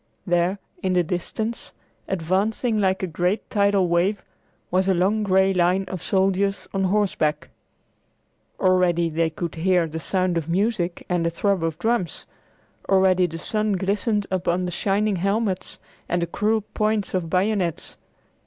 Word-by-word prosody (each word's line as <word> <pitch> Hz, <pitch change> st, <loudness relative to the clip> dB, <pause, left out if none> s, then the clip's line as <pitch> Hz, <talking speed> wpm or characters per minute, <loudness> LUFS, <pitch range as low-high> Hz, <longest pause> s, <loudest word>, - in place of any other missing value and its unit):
There 175 Hz, +2 st, +1 dB, 0.2 s
in 185 Hz, -1 st, 0 dB
the 180 Hz, -1 st, +3 dB
distance, 215 Hz, +7 st, -4 dB, 0.3 s
advancing 200 Hz, +6 st, 0 dB
like 190 Hz, -1 st, +1 dB
a -, -, +3 dB
great 180 Hz, +4 st, -1 dB
tidal 200 Hz, -2 st, +3 dB
wave, 175 Hz, +4 st, +1 dB, 0.5 s
was 185 Hz, +1 st, +2 dB
a 190 Hz, -, +3 dB
long 195 Hz, +5 st, +2 dB
gray 190 Hz, -1 st, +3 dB
line 180 Hz, +1 st, +2 dB
of 185 Hz, -2 st, -6 dB
soldiers 195 Hz, +1 st, +1 dB
on 195 Hz, -1 st, +1 dB
horseback. 180 Hz, -6 st, 0 dB, 1.1 s
Already 180 Hz, -3 st, +2 dB
they 165 Hz, +1 st, +1 dB
could 165 Hz, +1 st, -5 dB
hear 175 Hz, +1 st, +2 dB
the 160 Hz, 0 st, -5 dB
sound 185 Hz, 0 st, 0 dB
of 165 Hz, 0 st, -8 dB
music 185 Hz, -1 st, -1 dB
and 175 Hz, -2 st, 0 dB
the 170 Hz, -, +1 dB
throb 190 Hz, +1 st, 0 dB
of 165 Hz, -1 st, -1 dB
drums; 220 Hz, -2 st, -1 dB, 0.6 s
already 190 Hz, -2 st, +4 dB
the 165 Hz, -1 st, -7 dB
sun 215 Hz, +4 st, -1 dB
glistened 205 Hz, +3 st, 0 dB
upon 180 Hz, -1 st, 0 dB
the 180 Hz, -, -3 dB
shining 200 Hz, +2 st, 0 dB
helmets 195 Hz, +1 st, -1 dB, 0.3 s
and 175 Hz, 0 st, +1 dB
the -, -, +1 dB
cruel 215 Hz, +5 st, 0 dB
points 215 Hz, -1 st, 0 dB
of 180 Hz, -3 st, -1 dB
bayonets. 185 Hz, -2 st, 0 dB
185 Hz, 150 wpm, -23 LUFS, 175-200 Hz, 1.1 s, already